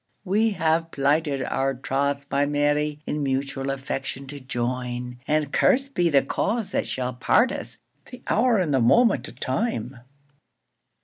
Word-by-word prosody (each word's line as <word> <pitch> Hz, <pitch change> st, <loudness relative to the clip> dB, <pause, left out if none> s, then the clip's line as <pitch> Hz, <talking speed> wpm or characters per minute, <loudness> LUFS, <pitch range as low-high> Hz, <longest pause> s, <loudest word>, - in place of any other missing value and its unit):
We 210 Hz, +4 st, +2 dB
hae 165 Hz, -5 st, +1 dB
plighted 145 Hz, -1 st, +1 dB
our 135 Hz, 0 st, -1 dB
troth, 140 Hz, +2 st, -1 dB
my 140 Hz, +1 st, +2 dB
Mary, 145 Hz, +1 st, 0 dB
In 150 Hz, -, -2 dB
mutual 135 Hz, 0 st, -2 dB
affection 135 Hz, 0 st, -4 dB
to 145 Hz, 0 st, -7 dB
join; 125 Hz, -1 st, -3 dB
And 150 Hz, -2 st, 0 dB
curst 275 Hz, +2 st, +2 dB
be 175 Hz, -6 st, +2 dB
the 140 Hz, -3 st, +4 dB
cause 205 Hz, -, -1 dB
that -, -, -1 dB
shall 125 Hz, 0 st, -3 dB
part 235 Hz, -, +3 dB
us! -, -, -6 dB, 0.3 s
The 250 Hz, -, -11 dB
hour 235 Hz, +1 st, +3 dB
and 170 Hz, -7 st, 0 dB
the 135 Hz, -, +3 dB
moment 225 Hz, -, +4 dB
o' -, -, -10 dB
time! 130 Hz, -, -2 dB
140 Hz, 150 wpm, -24 LUFS, 135-170 Hz, 0.3 s, the